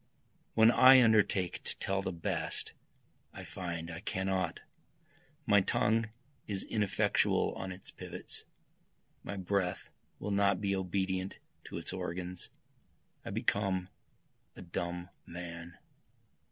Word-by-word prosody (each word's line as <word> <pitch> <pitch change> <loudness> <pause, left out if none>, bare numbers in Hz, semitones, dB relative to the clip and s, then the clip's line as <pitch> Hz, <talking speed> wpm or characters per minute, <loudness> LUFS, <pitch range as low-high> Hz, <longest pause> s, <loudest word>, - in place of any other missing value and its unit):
When 110 +1 +7
I 130 +1 +9
undertake 100 -5 +3
to - - -4
tell 95 0 0
the 95 - -2
best 85 -2 -2 0.6
I - - -8
find 85 -2 -5
I 80 - -6
cannot, 95 -3 -1 0.9
My 100 -4 +6
tongue 110 +3 +2 0.4
is 100 -2 -2
ineffectual 105 -3 +2
on 95 0 -5
its 90 +1 -10
pivots, - - -8 0.8
My 100 - -5
breath 95 -1 -1 0.3
will 105 - -4
not 100 -2 +3
be 100 -1 0
obedient 95 0 -1 0.3
to - - -6
its - - -5
organs, 90 +1 -5 0.7
I - - -6
become 95 -2 0 0.7
a - - -9
dumb 85 +1 -4 0.2
man. 85 0 -7
95 Hz, 115 wpm, -33 LUFS, 90-100 Hz, 0.9 s, I